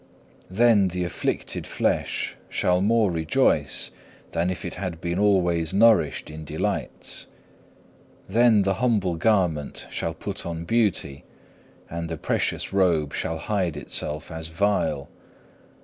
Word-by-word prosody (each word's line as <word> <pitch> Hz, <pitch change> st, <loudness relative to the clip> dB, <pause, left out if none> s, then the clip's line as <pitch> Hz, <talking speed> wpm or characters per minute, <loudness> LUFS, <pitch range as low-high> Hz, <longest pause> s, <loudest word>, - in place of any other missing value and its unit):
Then 105 Hz, 0 st, +4 dB
the 90 Hz, 0 st, -2 dB
afflicted 90 Hz, -, -3 dB
flesh -, -, -1 dB
shall 90 Hz, 0 st, +1 dB
more 110 Hz, -1 st, +3 dB
rejoice 80 Hz, -2 st, +1 dB, 0.4 s
than 85 Hz, +2 st, 0 dB
if 90 Hz, -, -4 dB
it -, -, -4 dB
had 90 Hz, -3 st, -5 dB
been 85 Hz, +2 st, -2 dB
alway 90 Hz, -5 st, +3 dB
nourished 110 Hz, -6 st, +4 dB
in 80 Hz, 0 st, -8 dB
delights. 75 Hz, -, -3 dB, 1.0 s
Then 110 Hz, 0 st, +4 dB
the 95 Hz, 0 st, +2 dB
humble 105 Hz, -8 st, +2 dB
garment 85 Hz, -6 st, +1 dB
shall -, -, -3 dB
put -, -, -5 dB
on 85 Hz, -1 st, -5 dB
beauty, 95 Hz, -10 st, 0 dB, 0.6 s
and 85 Hz, 0 st, -5 dB
the 80 Hz, -, -4 dB
precious 75 Hz, -, -1 dB
robe 85 Hz, -6 st, +2 dB
shall 80 Hz, -, -2 dB
hide 90 Hz, -4 st, -1 dB
itself 75 Hz, +3 st, -3 dB
as 80 Hz, 0 st, -4 dB
vile. 80 Hz, -5 st, 0 dB
90 Hz, 125 wpm, -25 LUFS, 80-100 Hz, 1.0 s, Then